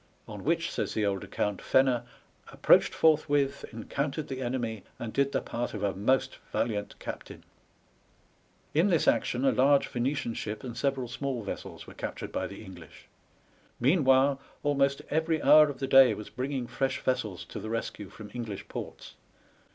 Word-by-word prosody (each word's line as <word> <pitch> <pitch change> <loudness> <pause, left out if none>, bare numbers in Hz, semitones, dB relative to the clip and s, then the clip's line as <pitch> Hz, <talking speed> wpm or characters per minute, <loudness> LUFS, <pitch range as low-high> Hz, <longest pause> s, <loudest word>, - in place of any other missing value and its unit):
on 105 -2 -8
which, 165 +2 0
says - - -3
the 110 - +1
old 100 -2 -1
account, 105 -2 -2
Fenner 130 -3 +3 0.2
*' - - -20
approached - - +4
forth 155 -1 +3
with, 140 -1 +1
encountered 140 +6 -3
the 130 -1 -4
enemy, 120 -5 -3
and 115 -2 -6
did 140 0 +2
the - - 0
part 120 -1 -4
of 105 - -4
a 100 -1 +1
most 130 +6 +1
valiant 105 -3 -2
captain." - - -8 1.3
In 165 +6 +4
this 175 -5 +2
action 125 +2 +2
a - - +5
large 140 +2 +4
Venetian 125 -1 -1
ship 105 -1 -5
and 120 -3 -6
several 135 -1 -1
small 125 -1 -3
vessels 100 - -7
were - - -12
captured - - -6
by - - -2
the - - -10
English. 90 -5 -13 0.7
Meanwhile 135 -1 +4 0.2
almost 140 -1 +1
every 160 +1 +1
hour 150 +2 +7
of 140 - -5
the 135 - -2
day 130 -4 +7
was 105 - -9
bringing 130 -1 -3
fresh 130 +2 -1
vessels 110 -7 -2
to - - -7
the 110 - -6
rescue 110 -3 -4
from 105 -2 -11
English 115 -5 -6
ports. - - -7
130 Hz, 170 wpm, -29 LUFS, 110-140 Hz, 1.3 s, hour